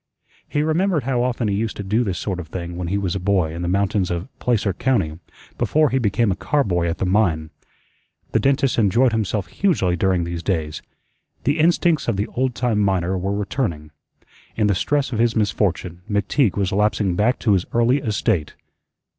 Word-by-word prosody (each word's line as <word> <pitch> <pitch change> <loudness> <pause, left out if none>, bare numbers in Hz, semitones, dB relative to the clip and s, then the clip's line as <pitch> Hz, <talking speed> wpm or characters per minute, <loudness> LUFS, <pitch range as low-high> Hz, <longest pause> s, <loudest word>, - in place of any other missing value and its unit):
He 145 - 0
remembered 160 0 +1
how 125 -1 0
often 120 -2 0
he 100 - 0
used 110 +2 -2
to 100 - -4
do 105 +5 +1
this 95 -5 -2
sort 95 -1 -3
of 85 - -7
thing 85 +1 -6
when 90 0 -4
he 100 +4 0
was 95 -3 -1
a 95 - -2
boy 90 -4 +1
in 85 - -5
the 85 - -2
mountains 95 0 +1
of 85 +7 -3
Placer 110 -5 +1
County, 95 -9 0 0.4
before 155 -2 +2
he 130 - +2
became 110 -1 +1
a - - 0
car 145 +7 0
boy 90 -5 0
at 85 - -2
the - - -1
mine. 90 -6 +1 0.8
The - - +2
dentist 135 -2 +2
enjoyed 115 +4 +3
himself 110 -3 -1
hugely 95 - +1
during 90 0 +1
these 85 0 -4
days. 80 -5 -2 0.6
The 145 +5 +1
instincts 170 -1 +2
of - - 0
the 100 - 0
old 130 -1 -1
time 120 -4 0
miner 95 -2 +1
were 95 +2 -2
returning. 90 - -3 0.6
In 110 - +1
the 105 - +3
stress 140 +8 0
of 110 - -2
his 115 -1 +2
misfortune 95 -5 -1
McTeague 105 +2 +1
was 95 -2 0
lapsing 105 -2 +1
back 110 +7 +2
to 110 - +2
his 95 -2 0
early 120 +4 +3
estate. 110 - -1
100 Hz, 195 wpm, -21 LUFS, 90-120 Hz, 0.8 s, enjoyed